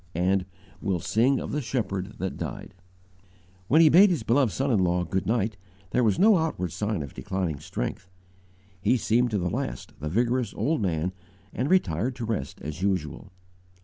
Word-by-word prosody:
and 95 +2 +1 0.3
"We'll 95 -4 0
sing 125 +9 +2
of - - -5
the 150 - -1
Shepherd 105 -5 -3
that 95 0 -3
died." - - -6 0.9
When 155 +8 +5
he 160 - +7
bade 195 +6 +7
his 165 -10 0
beloved 120 +1 +3
son 135 +1 -1
in 110 - +3
law 90 -1 +2
"good 95 +1 -2
night," 110 -2 0 0.3
there 125 - +2
was 105 -4 +2
no 205 -2 +6
outward 125 - -2
sign 105 -5 -2
of 70 - -9
declining 85 +1 -3
strength. 95 +5 -5 0.7
He 125 - +3
seemed 120 +2 +2
to 105 - 0
the 90 -2 -1
last 105 - -4
the 75 +2 -3
vigorous 120 +6 0
old 155 -2 0
man, 90 -2 0 0.4
and 130 +4 -1
retired 120 - +1
to 120 -3 -4
rest 105 -12 -3
as 75 +4 -6
usual. 95 -2 -2
105 Hz, 180 wpm, -26 LUFS, 90-125 Hz, 0.9 s, he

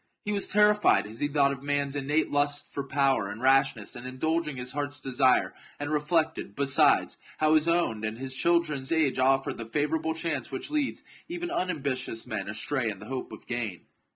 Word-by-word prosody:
He 210 - -1
was 200 -1 0
terrified 210 - +4
as 110 +2 -9
he 145 - +1
thought 140 -1 +2
q{ 130 - -15
man's 145 -1 -1
innate 145 +3 0
lust 145 0 +1
for 140 - -3
power 135 -6 +1
and 105 +2 -7
rashness 135 +2 +2
in 120 +1 -7
indulging 150 +3 -1
his 125 0 -4
heart's 145 +1 -3
desire, 130 -1 +2 0.3
and 145 +1 -3
reflected, 155 - 0
besides, 140 -1 +3 0.2
how 155 0 +3
his 155 +1 +3
own 165 -11 +1
and 110 +1 -3
his 130 +1 -4
children's 155 -4 +1
age 150 -6 +2
offered 135 0 +2
the 115 - -4
favourable 155 +5 -1
chance 160 -6 -3
which 130 - -6
leads 295 -3 -1 0.2
even 345 0 -4
unambitious 135 - -2
men 110 - -4
astray 115 +3 -1
in 105 - -5
the 100 - -11
hope 130 +2 -5
of - - -11
gain. 115 -7 -3
140 Hz, 185 wpm, -28 LUFS, 130-160 Hz, 0.3 s, terrified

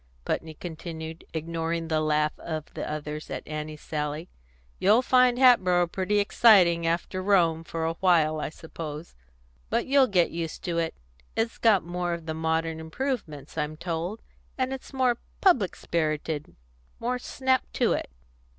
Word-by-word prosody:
Putney 160 -1 -2
continued, 160 -1 -7
ignoring 165 +1 -2
the 155 -1 +1
laugh 150 0 +2
of 155 -2 -5
the - - -4
others 150 0 -5
at - - -5
Annie's 155 0 -5
sally: 150 +2 -3 0.5
"You'll 215 +6 +5
find 250 -1 +4
Hatboro' 185 -9 +5
pretty 190 +4 -1
exciting, 190 -5 +5
after 170 +2 -1
Rome, 170 -5 +3
for 165 -1 -3
a 165 - 0
while, 165 -3 +3
I - - -2
suppose. 155 0 -8 0.6
But - - +1
you'll 270 -1 +5
get 180 -6 +2
used 165 -1 -5
to 170 -1 -1
it. 165 -1 -1 0.4
It's 225 +1 -1
got 215 -5 +4
more 175 0 -2
of 170 -1 -10
the 160 - -3
modern 160 0 -1
improvements, 160 - -4
I'm 150 +1 -2
told, 170 +5 -4 0.3
and 260 0 0
it's 265 - -8
more 255 -3 +1 0.2
public 255 - +3
spirited 155 -2 -2 0.4
more 250 +2 -1
snap 260 0 0
to - - +2
it. - - -3
170 Hz, 150 wpm, -27 LUFS, 160-205 Hz, 0.6 s, You'll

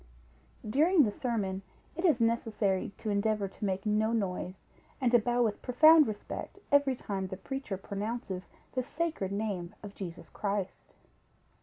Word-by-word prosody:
During 310 - +5
the 215 - +1
sermon, 205 -5 -2 0.3
it 340 - -4
is 305 -8 +4
necessary 225 -4 +1
to 215 - -3
endeavor 205 0 +1
to 195 - -6
make 190 0 -1
no 215 +1 +2
noise, 185 -4 -1 0.4
and 250 -4 +2
to 240 - +7
bow 240 +2 +2
with 215 -3 -1
profound 310 +4 +7
respect 215 - -6
every 285 -2 +4
time 195 -5 -3
the 190 - -6
preacher 240 -1 -4
pronounces 200 -1 -4 0.2
the 255 - 0
sacred 300 - -2
name 200 -4 -3
of 205 -1 -8
Jesus 180 -4 -7
Christ. 200 -2 -3
215 Hz, 150 wpm, -31 LUFS, 195-250 Hz, 0.4 s, to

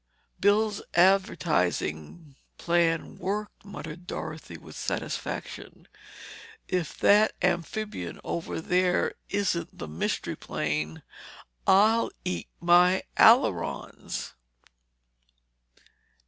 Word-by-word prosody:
"Bill's 205 +1 +2
advertising 155 - +1 0.2
plan 170 -1 0
worked," 205 +3 -4
muttered 175 -3 -9
Dorothy - - -6
with - - -13
satisfaction. - - -5 0.8
"If 180 -5 -2
that 210 +2 +5
amphibian 175 - -2
over 170 - -4
there 180 +1 +1 0.2
isn't 180 -4 -1
the - - -6
Mystery 75 +2 -2
Plane, 75 +1 -3 0.6
I'll 215 +4 +5 0.2
eat 180 - -3
my 180 +2 +5 0.2
ailerons!" - - +2
180 Hz, 75 wpm, -27 LUFS, 160-200 Hz, 0.8 s, that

